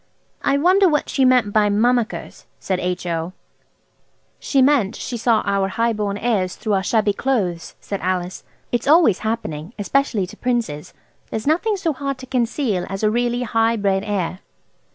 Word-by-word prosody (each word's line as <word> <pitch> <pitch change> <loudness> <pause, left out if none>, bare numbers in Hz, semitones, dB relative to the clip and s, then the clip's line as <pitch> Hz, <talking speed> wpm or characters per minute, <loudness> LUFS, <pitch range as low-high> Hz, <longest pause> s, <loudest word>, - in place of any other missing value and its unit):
"I 280 - +2
wonder 370 +5 +4
what 300 -2 0
she 270 - +2
meant 250 -5 +3
by 210 -1 +3
'mummickers'?" 235 +3 0
said 185 -2 -2
H.O. 180 -1 -3 1.1
"She 275 - 0
meant 255 -6 +3
she 250 - -5
saw 230 -1 +2
our 200 -1 +1
high 230 +4 0
born 205 -2 -2
airs 205 -6 0
through 215 - -2
our 195 - +2
shabby 210 +1 +1
clothes," 200 -9 -2
said 200 - -5
Alice. 180 0 -2 0.3
"It's 240 - -1
always 300 - +5
happening, 210 -6 -4
especially 220 -1 0
to 180 - -12
princes. 225 -11 -2 0.3
There's 220 - -4
nothing 360 +8 +1
so 330 -4 -1
hard 275 -1 -4
to 260 - -10
conceal 240 -5 -1
as 195 +2 -5
a 215 - +3
really 240 +1 0
high 225 0 +1
bred 195 -2 0
air." 190 -3 -2
220 Hz, 165 wpm, -21 LUFS, 195-255 Hz, 1.1 s, always